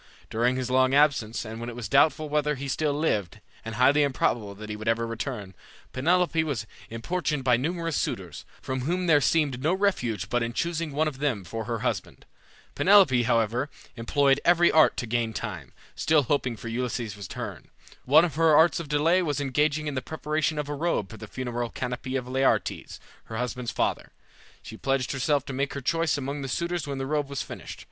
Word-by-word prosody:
During 120 +3 +1
his 130 -1 -3
long 130 +1 +3
absence, 135 -7 +2
and 110 +1 -7
when 120 +1 -5
it 120 - -8
was 120 -3 -5
doubtful 155 +6 +3
whether 150 0 0
he 140 +1 -6
still 145 +1 0
lived, 105 - -1 0.2
and 115 -1 -6
highly 135 +5 +4
improbable 120 -7 0
that 105 +2 -9
he 105 - -4
would 110 +1 -8
ever 115 +1 +1
return, 115 -4 -5 0.4
Penelope 165 +4 +2
was 140 -9 -3 0.2
importuned 150 +5 -2
by 125 -2 +4
numerous 165 +5 -2
suitors, 85 -9 -3 0.2
from 130 0 -3
whom 175 +7 -1
there 150 -4 +5
seemed 140 -5 +1
no 160 +6 +2
refuge 125 - 0
but 120 +3 0
in 115 0 -2
choosing 170 +1 -2
one 155 +3 +1
of 140 -4 -5
them 130 -9 -1
for 115 +4 -5
her 115 -1 -3
husband. - - -3 0.5
Penelope, 185 -11 +5
however, 120 +3 +1 0.3
employed 135 +4 +2
every 175 0 +5
art 155 0 +5
to - - -2
gain 115 -1 -1
time, 90 - -6 0.2
still 155 -2 +2
hoping 125 -2 -1
for 115 - -8
Ulysses' 120 -2 -3
return. 100 -3 -7 0.4
One 155 +6 +6
of 165 - -4
her 160 +1 +4
arts 160 +3 +5
of 165 -4 -7
delay 160 +5 +3
was 145 -5 -1
engaging 145 +2 0
in 150 - -2
the 130 - -2
preparation 155 +2 -2
of 150 -1 -2
a 145 - -3
robe 145 - -1
for 110 - -9
the 110 0 -9
funeral 120 0 -4
canopy 130 +2 -4
of 125 -2 -2
Laertes, 130 +1 0 0.3
her 110 - -6
husband's 125 0 -3
father. - - -1 0.5
She 110 - -9
pledged 135 -1 0
herself 140 +1 0
to 135 - -6
make 140 +2 -2
her - - -2
choice 165 +2 +1
among 140 +1 -4
the 135 - -4
suitors 170 +3 -2
when 140 -1 -3
the 135 - -3
robe 145 0 -1
was 140 -1 -3
finished. - - -9
135 Hz, 200 wpm, -26 LUFS, 115-150 Hz, 0.5 s, One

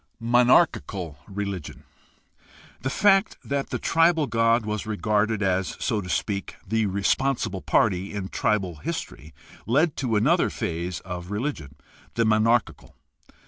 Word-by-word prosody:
c) - - -42 0.2
Monarchical 115 - +2
religion. 100 -5 -5 0.5
— - - -26
The 130 - -2
fact 195 +7 +3
that 140 -1 -2
the - - -2
tribal 165 -1 +3
god 115 -2 +2
was 105 0 -3
regarded 105 0 0
as, 95 0 0
so 110 -4 -1
to 90 - -8
speak, 100 +2 -2
the 110 +1 +1
responsible 100 +1 0
party 95 -2 +1
in 100 -2 -5
tribal 95 -6 -1
history 75 +1 -6 0.4
led 145 +7 +2
to 125 -5 -1
another 155 +12 +3
phase 85 +2 -4
of 90 -1 -7
religion, 105 - -4 0.4
the 115 - +2
monarchical. 110 -6 +1
105 Hz, 135 wpm, -25 LUFS, 95-120 Hz, 0.5 s, fact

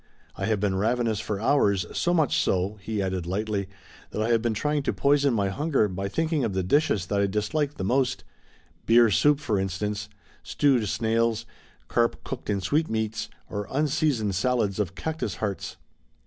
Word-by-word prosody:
I - - -3
have 110 -2 +1
been 100 -2 0
ravenous 115 +1 +1
for 105 -2 -3
hours, 105 -5 +2
so 175 - +1
much 160 -6 +2
so," 95 +3 0
he 105 0 -2
added 95 -2 -2
lightly, 100 +1 -2 0.4
"that - - -5
I 110 +2 0
have 115 -1 +3
been 115 -2 0
trying 150 +5 0
to - - -1
poison 140 0 +3
my 100 -4 +1
hunger 140 +1 +1
by 95 +1 -4
thinking 155 - 0
of 110 -4 -1
the 95 - 0
dishes 105 - +2
that 100 +2 -1
I 100 - +2
dislike 120 +9 -1
the - - -5
most, 125 +5 +1 0.6
beer 115 -1 +6
soup, 145 +8 +4
for 110 -9 0
instance, 105 +2 -3 0.3
stewed 130 -8 +1
snails, 115 +1 0 0.4
carp 115 -1 0
cooked - - -6
in 100 -1 0
sweetmeats 110 - -1 0.2
or 105 -1 -4
unseasoned 145 -7 +1
salads 105 -1 0
of 95 -2 -2
cactus 155 - -3
hearts." 100 +1 -4
110 Hz, 175 wpm, -26 LUFS, 100-135 Hz, 0.6 s, beer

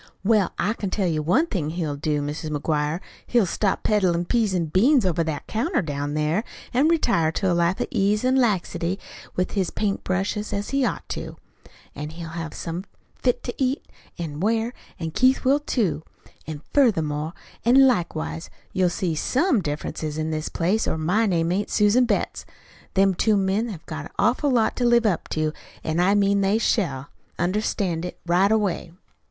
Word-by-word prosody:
"Well, 210 -2 +3
I 210 +4 +1
can 205 -4 -4
tell 190 -1 0
you 155 -2 0
one 185 - +3
thing 180 - -2
he'll 160 -3 -2
do, 150 0 -1
Mis' 150 +3 -4
McGuire. 150 +2 -1 0.3
He'll 235 -4 +3
stop 190 +2 0
peddlin' 180 -5 +2
peas 220 -2 +1
an' 170 -2 +1
beans 225 - +4
over 170 -2 +1
that 155 -3 -4
counter 240 - 0
down 145 -1 -3
there, 155 +7 +1 0.3
an' 265 +5 +4
retire 235 - +2
to 190 +1 +1
a - - +3
life 170 +2 +1
of - - +1
ease 210 +4 +1
an' 260 +1 +3
laxity 195 -6 +1 0.4
with 185 0 0
his 190 -4 0
paint 200 -2 -2
brushes, 195 +3 -2
as 200 0 -3
he 275 0 +2
ought - - -2
to. - - -5 0.6
An' 150 +1 -5
he'll 165 +1 -8
have 165 -1 -6
somethin' 170 +3 -5 0.2
fit 250 -2 0
to 245 - -4
eat 260 +2 -1 0.3
an' 155 -4 -5
wear, 225 +5 +1 0.3
an' 165 -2 -3
Keith 255 - +3
will, 275 +3 +4
too. 200 - 0 0.5
An' 155 -1 -6
furthermore 160 - +2 0.3
an' 265 +4 +6
likewise 170 -8 -1 0.2
you'll 185 -1 +3
see 175 -1 -1
SOME 260 - +1
difference 150 -2 -4
in 155 +1 -2
this 155 0 -2
place, 190 +6 0
or - - 0
my 180 +8 +2
name 170 -3 +1
ain't 200 +3 -1
Susan 210 +5 +4
Betts. - - -1 0.5
Them 195 0 +4
two 210 +3 +2
men 195 +4 +1
have 170 -7 -8
got 155 -2 -6
an - - -11
awful 245 +8 +2
lot 235 -4 +2
to 250 - 0
live 240 -1 +4
up 195 -6 0
to, 155 -1 -1 0.3
an' 160 +2 -1
I 190 +3 +4
mean 200 0 +3
they 195 +2 +3
shall 145 - 0 0.3
understand 180 -2 0
it 180 - -6
right 180 +4 +3
away." 200 -6 0
185 Hz, 185 wpm, -24 LUFS, 160-220 Hz, 0.6 s, an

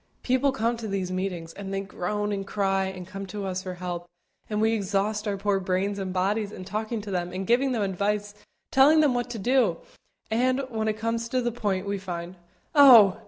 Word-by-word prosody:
People 260 +2 +2
come 230 0 0
to 225 -1 -5
these 195 -2 -2
meetings, 180 -3 -3
and 195 -1 -7
they 195 0 -1
groan 205 +2 -3
and 195 -1 -3
cry 195 -1 +1
and 190 -1 -6
come 195 +1 -7
to 200 +1 -5
us 185 -1 -2
for 185 -1 -6
help, 175 -1 -5 0.4
and 210 -1 -1
we 220 +1 +3
exhaust 205 +1 -1
our 200 -1 -1
poor 200 0 +1
brains 195 +2 -1
and 190 -1 -3
bodies 200 +3 0
in 185 - -8
talking 215 +2 -3
to 205 -1 -7
them 180 -1 -2
and 190 +1 -4
giving 255 +5 +3
them 230 -4 0
advice, 205 +2 -1 0.4
telling 295 +4 +6
them 290 -4 +3
what 245 0 -2
to 240 - -5
do, 230 -5 +2 0.5
and, 255 +3 +2
when 220 -2 -2
it 215 0 0
comes 230 +1 -2
to 255 - +1
the 240 -1 0
point, 205 -5 -2
we 200 0 -2
find, 175 -1 -6 0.4
"Oh! 240 -10 +8
205 Hz, 210 wpm, -26 LUFS, 190-230 Hz, 0.5 s, Oh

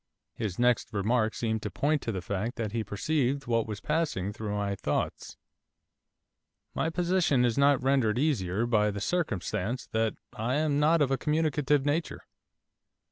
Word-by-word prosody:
His 100 -5 -4
next 120 -1 +2
remark 110 +2 +1
seemed 110 -2 -1
to 105 - -3
point 145 +7 0
to 115 - -3
the 95 -4 -4
fact 100 +6 -3
that 110 -4 -3
he 115 0 -1
perceived 135 +7 -1
what 115 -2 +1
was 105 -2 -5
passing 150 - -1
through 105 -1 -4
my 100 -1 -1
thoughts. 100 - -3 1.4
'My 160 - 0
position 175 -6 +2
is 120 -2 +1
not 140 -2 +3
rendered 130 -5 +2
easier 115 - +1
by 105 -3 +2
the 100 0 -4
circumstance 110 - -2
that 110 0 0 0.2
I 120 +4 -1
am 150 -1 +1
not 155 +1 +4
of 135 - 0
a 135 - +1
communicative 150 -2 +1
nature. 155 +3 -1
120 Hz, 160 wpm, -29 LUFS, 105-145 Hz, 1.4 s, not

